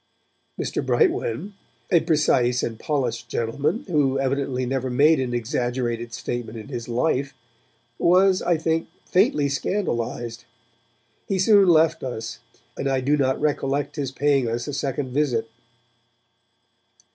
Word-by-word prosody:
Mr. - - -2
Brightwen, 380 - 0 0.4
a 170 - +6
precise 130 -6 +2
and 115 -1 -3
polished 125 -6 -2
gentleman 130 - -1
who 145 -7 +1
evidently 135 -1 -1
never 130 0 -2
made 145 +5 +4
an 130 -2 -1
exaggerated 120 -1 -2
statement 120 -1 -5
in 110 +4 -9
his 120 -3 -6
life, 135 +2 0 0.6
was, 185 +2 +4
I 175 -1 +2
think, 160 +1 -1 0.2
faintly 180 - +2
scandalized; 120 - -2 0.8
he 195 - 0
soon 195 0 +5
left 160 -1 +4
us, 115 -3 -5 0.4
and 140 - -3
I 135 -1 +1
do 140 +3 +2
not 130 -2 +1
recollect 145 -1 -1
his 140 -4 -3
paying 140 -1 +2
us 120 +3 -3
a 145 - -4
second 135 -1 -2
visit. 125 -6 0
135 Hz, 130 wpm, -23 LUFS, 120-155 Hz, 0.8 s, a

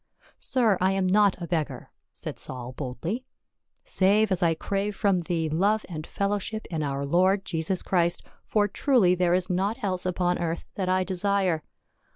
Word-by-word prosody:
"Sir, 225 -7 +1
I 190 +1 +3
am 195 -1 0
not 200 0 +3
a 175 - -4
beggar," 165 -3 -3 0.2
said - - -7
Saul 125 -1 -2
boldly, 150 - -4 0.6
"save 200 +2 +3
as 185 0 +1
I 165 -2 +3
crave 200 +4 -2
from 195 -3 +2
thee 165 -1 -1
love 200 +8 +1
and 155 -3 -6
fellowship 205 +2 -2
in 160 -2 -2
our 140 -1 -2
Lord 185 +6 +2
Jesus 170 +2 -1
Christ, 175 -1 +1 0.2
for 210 -1 +1
truly 205 -3 +3
there 180 -1 +2
is 185 0 +1
naught 190 +5 0
else 185 -2 -1
upon 180 0 0
earth 170 -1 -2
that 185 -2 -2
I 185 0 +2
desire. 190 -2 0
185 Hz, 170 wpm, -26 LUFS, 170-200 Hz, 0.6 s, I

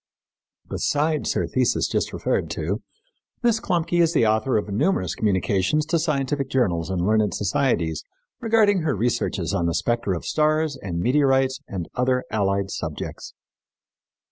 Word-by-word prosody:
Besides 150 +1 0
her - - 0
thesis - - +1
just - - -1
referred - - -1
to, - - -3 0.6
Miss 235 -2 +3
Klumpke 175 -3 0
is 165 0 +3
the 120 - +3
author 110 +3 +2
of 105 - -2
numerous 100 - 0
communications 100 - +1
to 165 +1 +1
scientific 140 -3 -1
journals 90 -11 0
and 90 -2 -1
learned 105 -2 +2
societies 90 - 0 0.4
regarding 220 -4 +3
her 155 - 0
researches 120 +4 -1
on 85 - +1
the 85 - -1
spectra 115 -6 0
of - - -9
stars 155 -1 +1
and 90 -9 -5
meteorites 135 +3 +2
and 90 -4 -5
other 125 0 +1
allied 100 -2 0
subjects. 80 -3 -6
125 Hz, 140 wpm, -23 LUFS, 95-155 Hz, 0.6 s, Miss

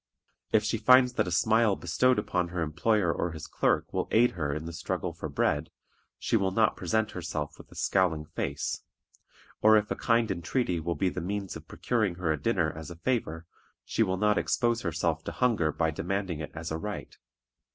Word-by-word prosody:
If - - +4
she - - -1
finds 125 0 +6
that 125 - 0
a - - -3
smile 110 +3 +3
bestowed 125 +10 +2
upon 90 -1 0
her 90 -1 -2
employer 85 +3 +1
or 85 - -2
his 80 - -7
clerk - - 0
will - - -1
aid 120 +2 +4
her 75 -5 -2
in 75 +2 -4
the 85 - -6
struggle 90 +1 -3
for 80 -1 -6
bread, 75 +2 0 0.5
she - - -1
will 100 -3 +2
not 110 +2 +2
present 110 +4 0
herself 80 -4 -5
with - - -14
a - - -14
scowling 85 -5 +1
face; - - -3 0.8
or 110 0 +7
if 105 0 -1
a - - +1
kind 115 -2 +2
entreaty 90 +1 -1
will 85 +1 -2
be 95 - +1
the - - -5
means 100 +2 -3
of - - -10
procuring 110 -7 -1
her 85 -2 -1
a 75 - -2
dinner 90 -9 +1
as 80 +1 -8
a 85 - -8
favor, 85 -5 -2 0.4
she - - -1
will 95 -4 +2
not 105 +1 +3
expose 120 -1 +1
herself 85 -1 -1
to - - -3
hunger 110 -11 +1
by 80 +1 0
demanding 95 0 -2
it 75 - -5
as 80 0 -5
a 80 - -2
right. 105 +2 -6
90 Hz, 205 wpm, -29 LUFS, 80-110 Hz, 0.8 s, or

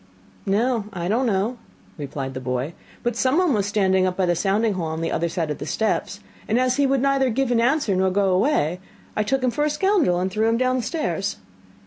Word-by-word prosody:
'No, 225 +2 +1
I 175 -1 -3
don't 240 +6 +1
know,' 220 +4 0 0.4
replied 140 -2 -5
the 130 - -5
boy, 130 +4 -3 0.3
'but 240 -1 -1
someone 285 +7 +2
was 205 -3 0
standing 190 -2 +2
by 185 +1 -1
the 175 -1 +1
sounding 205 +4 +1
hole 175 -4 -3
on 160 +1 -4
the 165 - -1
other 170 +1 0
side 165 -3 -2
of 150 - -5
the - - -5
steps, 210 -2 -1 0.3
and 225 +3 +2
as 255 0 +1
he 285 -1 +3
would 270 -1 +1
neither 275 -1 +2
give 255 +2 0
an 230 -1 +3
answer 245 -4 +2
nor 190 0 +2
go 195 0 +2
away, 180 - +1 0.4
I - - +1
took 260 +5 0
him 250 - +2
for 295 +4 -1
a 300 - +2
scoundrel, 310 - +2
and 185 +1 -1
threw 215 +3 +1
him 230 - +2
downstairs. 255 +5 -1
215 Hz, 215 wpm, -23 LUFS, 185-255 Hz, 0.4 s, he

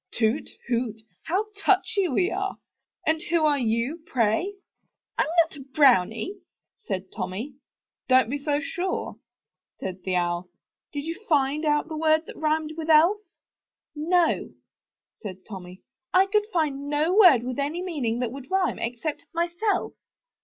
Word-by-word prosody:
"Hoot! 225 +5 +1 0.2
toot! 235 -3 -1 0.3
How 375 +6 0
touchy 395 -1 +2
we 355 +5 +1
are! 390 +1 -2 0.5
And 315 0 +2
who 335 -2 +3
are 290 -2 +3
you, 240 +7 -1
pray? 250 - +1 0.6
"I'm - - +1 0.2
not 325 - -12
a - - -10
brownie," 265 - +2 0.4
said 190 - -5
Tommy. 205 +7 -4 0.5
"Don*t 255 -2 +5
be 285 0 -3
too 290 -1 +1
sure," 360 +3 -3 0.6
said 185 0 -5
the 185 -1 -1
Owl. 175 0 -1 0.4
"Did 285 -1 -4
you 330 +6 -5
find 295 0 +2
out 295 +1 +2
the 320 - -5
word 315 0 +3
that - - -10
rhymed 310 0 0
with 325 0 -5
Elf?" 330 +7 +6 0.8
"No, 335 +3 +2 0.7
said 190 -3 -8
Tommy, 185 -3 -9 0.3
"I 375 +1 +5
could 420 +1 +1
find 285 -4 -1
no 300 +4 +1
word 350 - +7
with 255 +2 -4
any 305 +6 -1
meaning 275 -11 -1
that 240 -2 -1
would 270 +2 -9
rhyme, 380 -1 +1
except, 245 +6 -3
'myself. 345 +4 0
295 Hz, 145 wpm, -26 LUFS, 235-340 Hz, 0.8 s, word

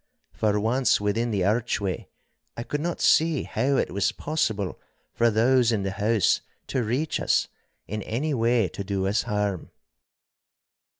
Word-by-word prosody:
For 105 -1 +1
once 120 +5 +2
within 105 +3 0
the 100 -5 0
archway, 105 -3 -1 0.5
I 115 - -3
could 145 +4 -3
not 175 +1 -2
see 160 -3 +3
how 135 +5 0
it - - 0
was 100 0 +1
possible 110 - -2 0.3
for 115 0 +3
those 120 +2 +3
in 105 -4 0
the 95 - -2
house 105 +1 +2 0.3
to 130 - 0
reach 125 +8 -1
us, - - +1 0.4
in 105 +1 -4
any 135 +9 -2
way 115 -3 +2
to 100 - -6
do 95 -1 -2
us 100 +3 +1
harm. 105 -3 -2
110 Hz, 155 wpm, -25 LUFS, 100-125 Hz, 0.5 s, see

